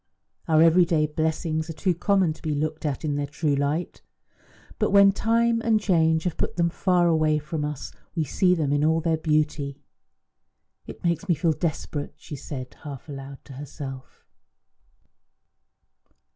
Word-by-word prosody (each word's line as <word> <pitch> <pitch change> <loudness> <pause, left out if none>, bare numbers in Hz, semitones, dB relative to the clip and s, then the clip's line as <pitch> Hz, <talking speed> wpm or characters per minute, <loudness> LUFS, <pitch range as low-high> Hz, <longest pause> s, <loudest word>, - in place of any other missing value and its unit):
Our 160 0 +5
everyday 165 -2 +4
blessings 160 +1 -1
are - - -3
too 185 +3 0
common 185 -1 +2
to - - -18
be 155 -2 -2
looked 155 +1 -2
at 145 +1 -3
in 145 -2 -1
their 145 0 -2
true 150 +1 -1
light; 145 +5 -2 0.8
but - - +2
when 200 -1 +7
time 230 +3 +1
and 225 -2 +3
change 160 -5 +2
have 180 - -2
put - - -2
them 170 -1 +1
far 180 0 +2
away 155 -2 +3
from 150 +1 -4
us 150 -2 -4 0.2
we 165 - +1
see 180 +5 +2
them 150 -4 0
in 145 0 +1
all 160 +1 +3
their 165 0 +1
beauty. 150 -3 0 1.1
"It - - -10
makes 170 +3 -1
me 175 - +4
feel 165 0 +1
desperate," 150 -2 -3
she 150 - -9
said 130 -1 -7
half 140 -2 -8
aloud 135 -1 -9
to 140 - -11
herself. 135 -1 -9
155 Hz, 160 wpm, -25 LUFS, 145-175 Hz, 1.1 s, when